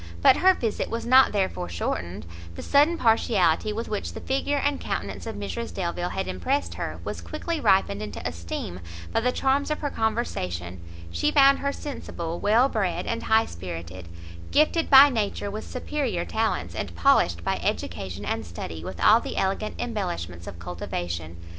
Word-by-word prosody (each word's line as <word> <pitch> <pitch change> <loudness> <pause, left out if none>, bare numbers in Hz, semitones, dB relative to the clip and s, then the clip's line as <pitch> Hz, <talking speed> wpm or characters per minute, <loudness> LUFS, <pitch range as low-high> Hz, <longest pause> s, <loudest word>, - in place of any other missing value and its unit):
But - - +7
her 375 +1 +5
visit 225 -3 -2
was 230 +1 -3
not 260 +2 +6
therefore 185 - -1
shortened; 85 +2 -3 0.3
the - - -7
sudden 295 +4 +4
partiality 215 - +2
with 225 +2 -4
which 210 - -3
the - - -6
figure 275 +2 0
and 285 0 0
countenance - - -4
of 225 - -5
Mrs 230 +3 -4
Delvile 175 -1 -2
had 190 - -3
impressed 280 +2 -1
her, - - -5
was - - -5
quickly 325 +1 -4
ripened 190 - +3
into 105 -1 -5
esteem 85 +1 -5 0.3
by - - +3
the 250 +2 +1
charms 275 +3 +1
of 305 - -2
her 290 -2 -2
conversation: 90 - -2 0.3
she 295 - +1
found 275 -2 +6
her 280 - -1
sensible, 170 - -5
well 225 +5 +4
bred, 200 -8 -1
and 230 0 -2
high 220 0 +3
spirited, 85 0 -8 0.4
gifted 310 +2 +2
by 275 +1 +10
nature 205 -4 -2
with 215 +1 -6
superior 250 -9 -2
talents, 225 0 -1
and - - -5
polished 85 - +3
by - - 0
education 95 +2 -3
and - - -2
study 85 -1 -7
with 90 0 -7
all 220 - +6
the - - -6
elegant 195 +3 -1
embellishments 175 - -4
of - - -7
cultivation. 85 -1 -5
210 Hz, 170 wpm, -25 LUFS, -, 0.4 s, by